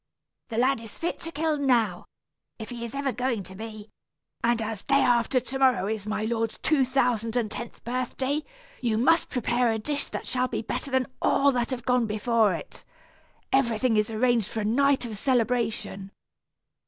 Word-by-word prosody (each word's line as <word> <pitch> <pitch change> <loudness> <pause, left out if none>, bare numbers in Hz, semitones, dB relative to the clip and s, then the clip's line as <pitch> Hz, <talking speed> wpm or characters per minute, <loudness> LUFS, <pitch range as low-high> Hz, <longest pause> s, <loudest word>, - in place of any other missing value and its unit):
The 225 - -4
lad 255 0 +2
is 225 -2 -11
fit 340 - -3
to 330 - -5
kill 315 0 0
now, 235 -10 +1 0.5
if 220 0 -8
he 240 -1 -6
is 235 +2 -6
ever 275 -1 0
going 245 -4 -1
to 190 +1 -9
be; 215 +1 -9 0.5
and 235 0 +2
as 220 -2 -3
day 275 - +1
after 245 +1 +3
to 265 +2 -5
morrow 255 -7 +4
is 215 0 -3
my 215 0 -1
lord's 225 0 -1
two 290 -4 +2
thousand 245 -3 +1
and 230 -4 0
tenth 240 +1 -7
birthday, 255 +4 -1 0.4
you 230 -3 0
must 325 +8 +3
prepare 245 -1 +1
a 220 - 0
dish 285 +6 -1
that - - -5
shall 255 0 +1
be - - -3
better 255 - -3
than 260 -1 +2 0.2
all 280 0 +4
that 245 -2 -1
have 255 -3 -4
gone 250 -2 +2
before 215 0 +2
it. 160 - -9 0.7
Everything 240 -3 +2
is 215 +1 +2
arranged 230 -1 +2
for 220 - -3
a - - -2
night 275 +4 +3
of 215 -4 -6
celebration. 230 -6 0
240 Hz, 185 wpm, -26 LUFS, 220-260 Hz, 0.7 s, morrow